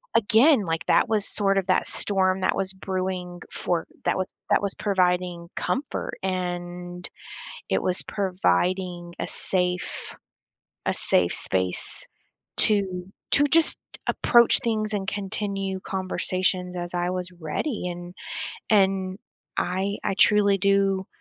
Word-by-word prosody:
again, 230 +3 +5
like, 165 0 -2
that 230 - +3
was 215 -2 +2
sort 195 -2 +2
of 190 -1 0
that 185 - +2
storm 190 -1 +1
that 185 - +1
was 190 0 -1
brewing 185 -2 -4
for 170 -2 -1 0.2
that - - +1
was 185 - -1 0.2
that - - +4
was 200 -1 0
providing 180 -3 0
comfort 270 +2 -3
and 175 -1 -4 0.6
it 95 - +1
was 180 0 +3
providing 180 - -1
a - - -2
safe 180 -1 0 0.7
a - - +2
safe 90 -1 +3
space 95 -1 0 0.5
to 190 -4 +2 0.2
to 285 - +7
just 325 +2 +4 0.3
approach 235 -1 +4
things 215 -2 0
and 195 -1 -2
continue 195 -1 -3
conversations 185 -1 -1
as 175 0 -5
I 175 0 0
was 180 0 -3
ready, 180 - -3
and 175 +1 -8 0.6
and 190 -2 +2 0.4
I 190 +3 -1
I - - 0
truly 200 0 +5
do 195 -1 +2
185 Hz, 125 wpm, -25 LUFS, 180-200 Hz, 0.7 s, to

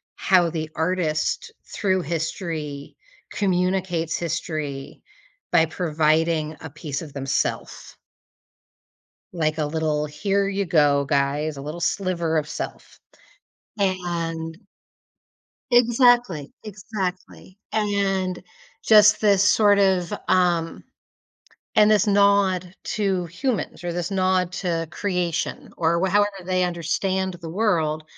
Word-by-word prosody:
how 180 -3 +3
the 160 -1 -4
artist, 165 - -1 0.2
through 190 -2 +1
history, 155 -2 -4 0.4
communicates 180 -3 0
history 155 -5 -4 0.5
by 160 - +5
providing 155 -1 0
a 160 - -7
piece 145 -1 -5
of 155 -3 -9
themself. 135 -1 -3 1.4
Like, 155 -2 -1
a 155 - 0
little, 155 -1 -1
"Here 195 +7 -1
you 200 0 -1
go, 145 -4 +3
guys." 145 +2 0
A - - -6
little 155 +4 -6
sliver 170 -5 0
of 150 - -1
self. - - -7 0.8
And 170 -4 -2 1.1
Exactly, 240 - +3
exactly. 190 -2 -6 0.2
And 195 -3 0 0.4
just 210 -1 +7
this 200 -2 +4
sort 205 -1 +4
of, 185 -3 +2
um 175 -3 +1 0.9
and 210 0 +5
this 210 0 +4
nod 200 -3 +3
to 195 -4 -1
humans 215 - -3
or 175 -1 -3
this 175 +1 -3
nod 185 -2 +1
to 170 -3 -2
creation 180 - -2
or 170 0 +2
wa 190 - +1
however 205 +1 +4 0.2
they 185 0 +1
understand 185 +2 -1
the 165 - -7
world, 165 -6 0
175 Hz, 110 wpm, -23 LUFS, 160-195 Hz, 1.4 s, just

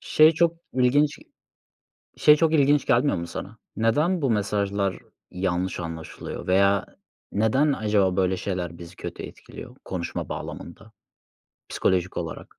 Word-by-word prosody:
Şey 155 +1 +5
çok 170 +1 +2 0.2
ilginç 130 +4 +2 1.0
şey 150 - +6
çok 160 0 +2
ilginç 145 -1 +3
gelmiyor 125 -1 +3
mu 85 0 -4
sana? 100 +6 -8 0.2
Neden 150 +10 +1
bu 135 - +2
mesajlar 100 -2 0 0.3
yanlış 90 0 -2
anlaşılıyor 80 -1 -7
veya 100 +2 +3 0.5
neden 130 +8 +2
acaba 105 -6 +1
böyle 95 -1 +1
şeyler 90 -3 -4
bizi 85 0 -11
kötü - - -7
etkiliyor - - -11
konuşma 90 -3 -4
bağlamında - - -8 0.8
psikolojik 90 -1 0
olarak? - - -6
100 Hz, 125 wpm, -25 LUFS, 90-145 Hz, 1.0 s, şey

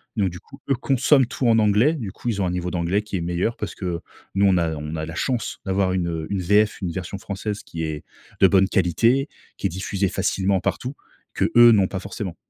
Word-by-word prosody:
donc 100 -4 +1
du 90 - -9
coup, 135 +9 -16
eux, - - +4
consomment 135 +1 +3
tout 125 0 -2
en 115 -1 +5
anglais, 105 +9 +4
du 110 - -5
coup, 120 - -5
ils 100 -3 -1
ont - - +1
un - - -1
niveau 90 0 -3
d'anglais 90 +4 0
qui 105 -2 -4
est - - -3
meilleur. 90 +7 -1
Parce - - -5
que 90 -3 -3 0.3
nous, 100 +1 +3
on 95 -2 +4
a 80 -2 0
on 75 +2 -5
a 80 0 -3
la 80 - -7
chance 120 +6 -2
d'avoir 95 -1 +1
une, 90 -2 0
heu, 80 -2 -3
une 95 -2 -1
VF, 105 +4 +2
une 90 -2 -2
version 95 +3 -5
française 100 +1 -5
qui 80 0 -6
est 75 -2 -4 0.4
de 95 - +8
bonne 95 -1 +4
qualité, 115 - +2 0.3
qui - - 0
est - - -5
diffusée 95 +2 -2
facilement 95 0 0
partout 130 +9 -3 0.4
qu'eux 120 0 +6
n'ont 100 -4 +4
pas 95 - -4
forcément. 100 -2 -6
95 Hz, 235 wpm, -23 LUFS, 90-110 Hz, 0.4 s, de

